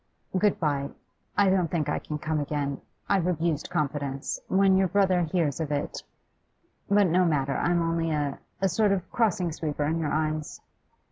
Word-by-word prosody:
'Good 200 +2 +2
bye, 140 -3 0 0.5
I 200 -2 +5
don't 180 -4 +2
think 155 -3 -1
I 150 - 0
can 150 - -5
come 155 +1 -1
again. 145 -1 -2 0.3
I've 190 -3 +2
abused 165 -3 -1
confidence. 140 -2 -2
When 195 0 +4
your 190 0 +3
brother 190 -1 +3
hears 165 -3 0
of 155 -2 -2
it. 145 -1 -2 0.9
But 205 0 +5
no 180 +1 +3
matter, 140 -5 +1
I'm 175 -1 +1
only 165 0 0
a 145 -3 -1 0.2
a - - +5
sort 200 +2 +2
of 185 -2 -3
crossing 190 -7 +1
sweeper 150 -2 -2
in 160 +3 0
your 155 -3 -1
eyes. 155 -1 -2
165 Hz, 175 wpm, -27 LUFS, 150-185 Hz, 0.9 s, I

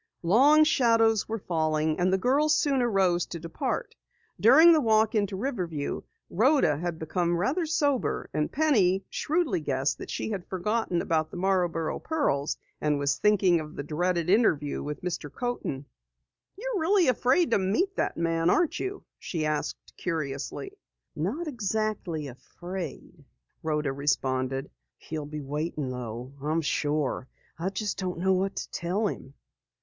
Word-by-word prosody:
Long 275 - +6
shadows 230 -8 +3
were 225 - -1
falling, 155 -4 0
and 180 +1 +2
the 190 - +3
girls 285 +9 +3
soon 275 -3 +2
arose 190 -7 +2
to 170 - -6
depart. 165 0 -3 0.5
During 290 - +8
the 310 - +4
walk 220 -2 +3
into 205 -3 0
Riverview, 180 - -3 0.3
Rhoda 175 - +2
became 170 +2 -1
rather 285 - 0
sober 290 -5 0
and 150 0 -1
Penny 205 -12 +2
shrewdly 305 - 0
guessed 135 -2 -1
that - - -8
she - - -3
had 195 -4 -4
forgotten 190 -1 -1
about 155 -1 0
the - - -8
Marborough 175 -3 0
pearls 220 - -1 0.2
and 150 -1 +1
was 140 0 0
thinking 195 -5 +4
of 155 -1 -8
the 140 - -4
dreaded 170 +3 -1
interview 175 -8 +2
with 150 +2 -6
Mr. 170 -5 -4
Coaten. 240 - -3 0.7
"You're 475 -1 -2
really 365 +2 +3
afraid 255 +7 +3
to - - +4
meet 285 - 0
that - - -1
man 165 0 +1
aren't 335 - +2
you?" 390 +1 -4 0.2
she 160 -4 -3
asked 155 -1 -3
curiously. 155 - -4 0.4
"Not 230 - -2
exactly 215 - -2
afraid," 175 +4 -8 0.4
Rhoda 150 -3 -1
responded. 135 -1 -1 0.3
"He'll 155 -2 -6
be 150 0 -6
waiting 145 -1 -3
though, 125 +1 -6
I'm 155 +3 0
sure. 145 -3 -1 0.3
I 175 +3 -1
just 205 +2 -3
don't 180 -2 -3
know 190 +2 +2
what 190 +1 0
to - - -5
tell 185 +6 -1
him." 140 -8 -5
180 Hz, 145 wpm, -27 LUFS, 155-230 Hz, 0.7 s, During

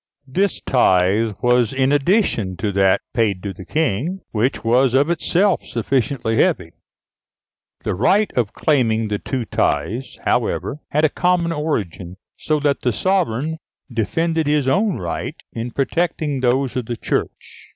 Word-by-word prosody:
This 185 +9 0
tithe 105 -2 +2
was 125 -1 +3
in 135 0 +2
addition 145 - +1
to 100 +3 -1
that 95 -1 +3
paid 105 -6 0
to 100 -2 -4
the 95 - -11
King, 155 - -1
which 120 +5 0
was 125 +2 +3
of 145 +5 +3
itself 180 +3 +1
sufficiently 120 -1 -1
heavy. 85 -3 +1 1.1
The - - -1
right 195 - +2
of 115 -4 0
claiming 115 -7 +1
the 105 -1 -1
two 130 -3 -3
tithes, 105 - -1
however, 150 - 0
had 150 +2 +2
a - - +3
common 175 +1 +1
origin, 100 - -3 0.2
so 155 -1 -1
that 145 -1 +1
the 125 - +1
sovereign 160 - 0 0.3
defended 160 +8 0
his 145 -2 +1
own 195 +7 +2
rights 85 -2 -5
in 115 +2 -4
protecting 150 +2 -1
those 130 +1 +1
of 125 -3 -3
the 120 - -3
Church. - - -4
130 Hz, 145 wpm, -20 LUFS, 110-155 Hz, 1.1 s, was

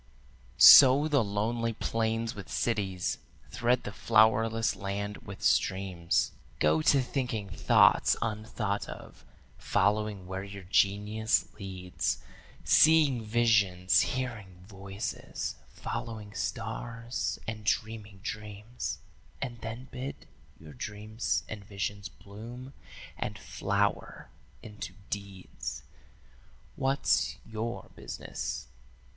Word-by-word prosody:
"Sow 140 +2 +10
the 140 -5 +3
lonely 115 +3 -1
plains 115 +1 -1
with 100 -3 -9
cities; 95 -6 -1 0.3
thread 120 +1 +1
the - - -5
flowerless 110 +1 +3
land 100 +1 -4
with - - -10
streams; 95 -3 +1 0.3
Go 80 +1 +3
to 135 - +4
thinking 120 -7 -3
thoughts - - +5
unthought 110 -2 -2
of, - - -10 0.4
following 105 -2 +1
where 95 +1 -5
your 100 -1 -9
genius 105 +4 +2
leads, 95 -2 -2 0.5
Seeing 150 -7 +5
visions, 105 -5 +3
hearing 110 -9 -4
voices, 100 0 -5
following 110 -3 -6
stars, 115 +2 -3
and 110 -1 -5
dreaming 105 -2 -2
dreams, 105 +2 -5 0.4
And 120 -3 -5
then 115 +3 -6
bid 130 +2 -6 0.3
your 80 -2 -12
dreams 110 - -3
and 105 -2 -7
visions 100 0 -4
bloom 115 +8 -10 0.5
and - - -3
flower - - -2 0.3
into 105 -1 -8 0.2
deeds. 95 -10 -6 0.9
'What's 135 +1 +1
your 115 +2 -5
business?' - - -5
110 Hz, 95 wpm, -30 LUFS, 100-115 Hz, 0.9 s, Sow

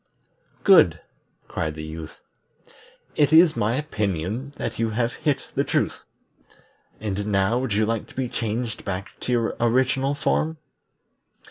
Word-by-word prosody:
"Good!" - - +6 0.5
cried 80 -1 -3
the 80 - -6
Youth. 80 0 -8 0.9
"It 145 -1 +3
is 160 0 +7
my 110 +4 +1
opinion 110 - -2
that 115 - -4
you 115 -1 +1
have 115 +2 -1
hit 150 -3 -1
the - - +1
truth. - - -1 1.0
And 105 -1 -3
now 100 +3 +2
would 130 -5 -2
you 110 +1 +3
like 115 0 -2
to - - -17
be 130 -1 -1
changed 115 0 -3
back 95 0 -4
to - - -3
your 115 -2 +1
original 130 +3 +2
form?" 160 +2 0
115 Hz, 140 wpm, -24 LUFS, 100-130 Hz, 1.0 s, is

